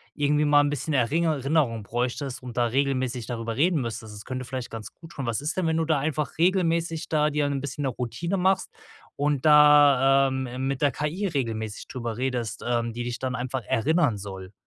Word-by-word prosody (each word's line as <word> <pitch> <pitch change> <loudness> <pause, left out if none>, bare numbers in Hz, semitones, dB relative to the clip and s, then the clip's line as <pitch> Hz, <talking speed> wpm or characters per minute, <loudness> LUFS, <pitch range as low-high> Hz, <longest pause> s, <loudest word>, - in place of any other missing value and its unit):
irgendwie 150 +1 +2
mal 145 0 +5
'n 145 0 0
bisschen 145 +1 -2
Eringer 150 +3 +1
Rinnerung 135 -7 +1
bräuchtest 125 +4 -3
und 125 -1 -9
da 120 - +3
regelmäßig 130 -2 -1
darüber 115 -2 -4
reden 160 +1 +2
müsstest, 110 -2 -5
das 105 - -10
könnte 130 0 -5
vielleicht 130 0 -5
ganz 110 -2 -7
gut 165 0 -14
tun. 135 -5 -5
Was 115 +2 -1
ist 155 +5 -3
denn, 180 -3 +1
wenn 160 - +1
du 165 - +1
da 155 -3 +2
einfach 150 +1 -3
regelmäßig 170 -2 +1
da 150 -1 +2
dir 150 -1 0
'n 140 -1 -1
bisschen 140 +1 -4
'ne 135 - +1
Routine 150 - -3
machst 190 - +1 0.4
und 145 -1 0
da, 145 -3 +6
ähm, 130 0 -3
mit 135 0 -2
der 145 - +3
KI 150 +10 -2
regelmäßig 115 - -3
drüber 115 -3 -5
redest, 125 -3 -3
ähm, 120 -1 0
die 120 - -4
dich 120 -1 -4
dann 130 -1 -2
einfach 125 +1 -3
erinnern 145 -1 +2
soll? 95 -1 -8
135 Hz, 205 wpm, -25 LUFS, 120-150 Hz, 0.4 s, da